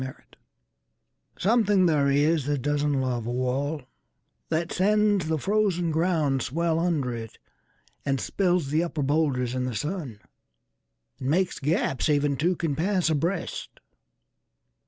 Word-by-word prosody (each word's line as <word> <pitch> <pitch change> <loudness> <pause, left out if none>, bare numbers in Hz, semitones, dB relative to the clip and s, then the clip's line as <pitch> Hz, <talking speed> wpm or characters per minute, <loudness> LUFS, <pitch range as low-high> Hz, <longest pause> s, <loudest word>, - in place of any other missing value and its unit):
Mending 130 0 -5
Wall - - -28 1.1
SOMETHING 205 -2 +3
there 150 -4 +3
is 145 +1 +2
that 145 -4 -1
doesn't 145 -1 +1
love 125 -3 -2
a - - -2
wall, 130 +4 -1 0.7
That 165 +1 -1
sends 205 -2 +2
the 160 0 0
frozen 190 -2 +1
ground 155 -5 +1
swell 165 +6 0
under 155 -8 0
it, 115 -1 -7 0.7
And 135 -1 0
spills 175 - 0
the 155 +2 +2
upper 165 -4 -2
boulders 135 -4 +1
in 130 -1 -1
the 125 -3 -3
sun; 150 - -4 1.0
And 130 -1 -3
makes 180 +4 +1
gaps 145 -1 0
even 145 -1 +2
two 175 +6 +1
can 160 -4 -2
pass 180 0 +1
abreast. 165 +4 -2
155 Hz, 135 wpm, -26 LUFS, 135-175 Hz, 1.1 s, SOMETHING